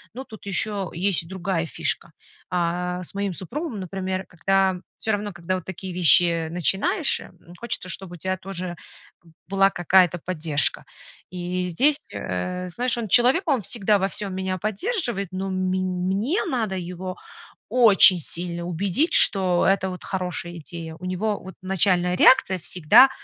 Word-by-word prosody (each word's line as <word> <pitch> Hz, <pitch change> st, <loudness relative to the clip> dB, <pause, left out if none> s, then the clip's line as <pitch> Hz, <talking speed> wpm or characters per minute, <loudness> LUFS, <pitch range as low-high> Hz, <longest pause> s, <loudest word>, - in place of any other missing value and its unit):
Но 260 Hz, -, -6 dB
тут 220 Hz, -5 st, -13 dB
ещё 200 Hz, -1 st, 0 dB
есть 180 Hz, 0 st, 0 dB
и -, -, -15 dB
другая 185 Hz, -2 st, -2 dB
фишка. -, -, -3 dB, 0.4 s
Э, 180 Hz, +1 st, -1 dB
с -, -, -5 dB
моим 200 Hz, -2 st, -2 dB
супругом, 245 Hz, -, -5 dB
например, 185 Hz, +1 st, -4 dB
когда 190 Hz, +2 st, +1 dB, 0.2 s
всё 220 Hz, -, -2 dB
равно, 205 Hz, 0 st, -2 dB
когда 175 Hz, +1 st, -3 dB
вот 185 Hz, -, -5 dB
такие 190 Hz, 0 st, -7 dB
вещи 170 Hz, -1 st, +4 dB
начинаешь, 205 Hz, -, 0 dB, 0.4 s
хочется, 235 Hz, -6 st, -3 dB
чтобы 185 Hz, 0 st, -4 dB
у -, -, -12 dB
тя 185 Hz, +3 st, -2 dB
тоже 185 Hz, -2 st, -5 dB, 0.7 s
была 195 Hz, 0 st, +4 dB
какая-то 175 Hz, 0 st, +3 dB
поддержка. 160 Hz, -5 st, 0 dB, 0.4 s
И 180 Hz, 0 st, -3 dB
здесь, 285 Hz, -, +2 dB
э, 180 Hz, -, -4 dB
знаешь, 245 Hz, +6 st, -1 dB
он 230 Hz, -, -3 dB
человек, 250 Hz, -, +4 dB
он 275 Hz, -5 st, +2 dB
всегда 205 Hz, 0 st, +2 dB
во 190 Hz, -, +1 dB
всём 200 Hz, 0 st, -4 dB
меня 190 Hz, 0 st, -3 dB
поддерживает, 215 Hz, -, -3 dB
но 190 Hz, +1 st, -3 dB
мень 185 Hz, 0 st, -1 dB, 0.2 s
мне 220 Hz, -, 0 dB
надо 220 Hz, -8 st, -1 dB
его 180 Hz, 0 st, -6 dB, 0.6 s
очень 205 Hz, -6 st, +7 dB
сильно 170 Hz, +2 st, -4 dB
убедить, 200 Hz, -, 0 dB
что 185 Hz, -3 st, +6 dB
это 190 Hz, 0 st, +2 dB
вот 180 Hz, -, -8 dB
хорошая 180 Hz, -2 st, -4 dB
идея. 160 Hz, +1 st, -9 dB
У 185 Hz, -, -7 dB
него 205 Hz, +3 st, -1 dB
вот 190 Hz, -, -10 dB
начальная 180 Hz, -1 st, +1 dB
реакция 190 Hz, -7 st, +5 dB
всегда 180 Hz, -, +5 dB
185 Hz, 150 wpm, -23 LUFS, 175-200 Hz, 0.7 s, очень